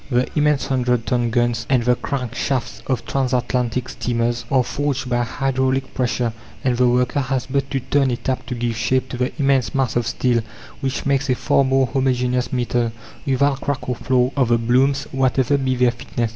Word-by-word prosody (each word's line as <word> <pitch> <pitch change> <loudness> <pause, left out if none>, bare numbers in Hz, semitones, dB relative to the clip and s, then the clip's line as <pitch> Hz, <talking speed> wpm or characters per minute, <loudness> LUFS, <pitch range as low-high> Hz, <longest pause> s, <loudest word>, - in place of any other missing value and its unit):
The 125 -1 +2
immense 150 -2 +2
hundred 125 -3 0
ton 120 -2 +1
guns 120 -1 0
and 130 -3 +3
the 125 +1 +4
crank 125 -2 -4
shafts 130 0 -2
of 125 -4 -1
transatlantic 125 -2 0
steamers 120 0 -1
are 130 -3 +3
forged 140 +1 -2
by 120 0 +2
hydraulic 130 +1 -1
pressure, 125 -2 0 0.3
and 125 -2 +2
the 125 +1 +3
worker 125 +3 +2
has 130 -2 -1
but 140 0 -1
to 135 - -1
turn 135 +1 +1
a 120 - -1
tap 130 +2 -3
to 125 - -3
give 120 -1 -2
shape 130 +3 0
to 125 - -5
the 125 +1 0
immense 135 -4 +1
mass 130 -4 0
of 120 -1 0
steel, 120 -1 +1 0.4
which 135 0 -3
makes 140 0 +1
a 125 - +3
far 140 - +2
more 135 0 +3
homogeneous 125 -1 0
metal, 120 -2 0 0.4
without 135 +1 +2
crack 140 -1 -3
or 125 - -1
flaw, 125 +1 +1
of 135 -4 +2
the 120 0 +3
blooms, 130 +4 +2
whatever 130 +1 +2
be 130 -2 0
their 125 -1 +3
thickness. 120 -1 -3
125 Hz, 195 wpm, -21 LUFS, 120-135 Hz, 0.4 s, the